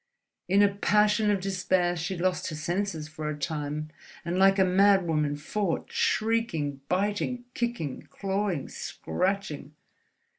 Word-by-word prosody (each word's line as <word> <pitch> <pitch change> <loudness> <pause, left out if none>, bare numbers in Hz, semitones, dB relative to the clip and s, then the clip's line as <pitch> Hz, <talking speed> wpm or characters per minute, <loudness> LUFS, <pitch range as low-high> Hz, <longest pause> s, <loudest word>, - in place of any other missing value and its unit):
In 195 +3 +5
a 200 -1 +3
passion 210 +1 +3
of 200 -2 +1
despair, 185 -2 +1
she 175 +3 -3
lost 180 +1 0
her 155 - -4
senses 170 0 -2
for 150 0 -5
a 150 - -4
time 150 0 -3 0.3
and 175 +2 -1
like 195 +1 +6
a 190 - +5
madwoman 180 -6 +3
fought, 175 +3 -2
shrieking, 190 -12 0
biting, 205 +6 0
kicking, 200 - -3
clawing, 195 -3 -2
scratching.... 155 - -3
185 Hz, 125 wpm, -28 LUFS, 155-200 Hz, 0.3 s, like